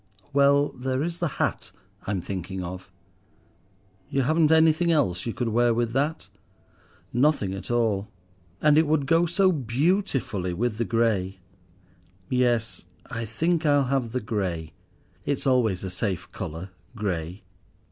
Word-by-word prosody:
"Well, 140 +1 +4
there 130 +2 -2
is 170 +1 -4
the 175 - +1
hat - - -1 0.4
I'm 95 -2 -1
thinking 95 0 -5
of." 90 +2 -7 1.2
"You 135 - +1
haven't 155 +3 +3
anything 160 +1 +4
else 120 - +1
you 115 - -2
could 120 -2 -1
wear 120 +1 +3
with 115 -1 0
that?" 145 +5 -1 0.9
"Nothing 120 -6 +2
at 95 - -7
all, 110 -4 +1 0.6
and 150 0 +6
it 160 - +2
would 150 -2 +2
go 165 +5 +3
so 185 +2 +3
beautifully 135 - 0
with 115 +2 -1
the 115 - +1
grey.—Yes, 95 +2 -2 0.2
I 115 0 -3
think 160 +10 0
I'll 145 -2 +4
have 125 -4 0
the 125 +1 -2
grey. 95 -7 -3 0.5
It's 145 -1 -2
always 120 -9 +2
a 95 - -4
safe 95 -1 -3
colour—grey." 90 +1 -5
115 Hz, 135 wpm, -25 LUFS, 95-145 Hz, 1.2 s, and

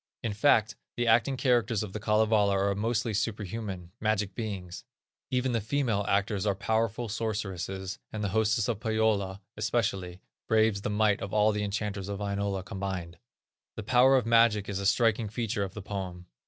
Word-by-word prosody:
In 115 - -1
fact, 110 -1 +3 0.2
the 120 - +1
acting 115 +3 +3
characters 120 -5 +2
of 100 -3 -7
the 105 - -4
Kalevala 105 -2 +3
are 100 +1 +1
mostly 115 +2 -1
superhuman, 100 -3 -3
magic 105 -2 0
beings. 95 -5 -5 0.5
Even 125 0 0
the 115 -2 0
female 115 -3 0
actors 100 0 +1
are 100 - +2
powerful 110 +3 -1
sorceresses, 95 -3 -3
and 110 -1 -4
the 100 - 0
hostess 110 +1 +1
of 115 -4 -1
Pohyola, 110 -3 0
especially, 95 -6 -1 0.3
braves 110 -2 +3
the - - -2
might 105 -1 +2
of 100 +1 -4
all 105 0 +4
the 105 0 -2
enchanters 100 -1 -3
of 100 - -3
Wainola 100 -2 -2
combined. 90 -3 -5 0.6
The 110 - -5
power 125 +4 +5
of 125 - 0
magic 115 -3 +4
is 100 -1 -3
a 100 - 0
striking 110 +1 +2
feature 115 -1 -2
of 95 -2 -3
the 105 - -6
poem. 95 -3 -5
105 Hz, 170 wpm, -29 LUFS, 100-115 Hz, 0.6 s, power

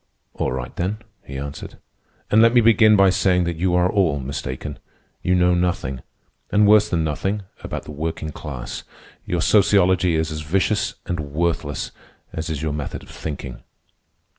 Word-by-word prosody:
"All - - -2
right, 65 -1 -5
then," 95 +5 -1 0.3
he 70 - -7
answered; 70 +1 -7 0.5
"and 110 - +6
let 115 +1 +5
me - - +8
begin 110 -1 +6
by 100 -2 +5
saying 90 -1 +2
that 85 0 -2
you 90 +1 +1
are 90 0 +4
all 90 -8 +1
mistaken. 65 -1 -5 0.4
You 90 - +2
know 90 0 +4
nothing, 85 -8 -1 0.5
and 105 0 +4
worse 105 0 +6
than 85 -3 +1
nothing, 95 +7 -2 0.2
about - - -5
the - - -9
working 80 +1 -4
class. 65 -5 -7 0.4
Your - - 0
sociology 95 -4 +4
is 80 0 0
as 75 0 -4
vicious 95 +7 0
and 85 -1 -3
worthless 75 -1 -2 0.4
as 80 +1 -4
is 80 -1 -3
your 75 -2 -1
method 75 -2 -5
of - - -15
thinking." 65 -5 -6
85 Hz, 165 wpm, -22 LUFS, 75-95 Hz, 0.5 s, me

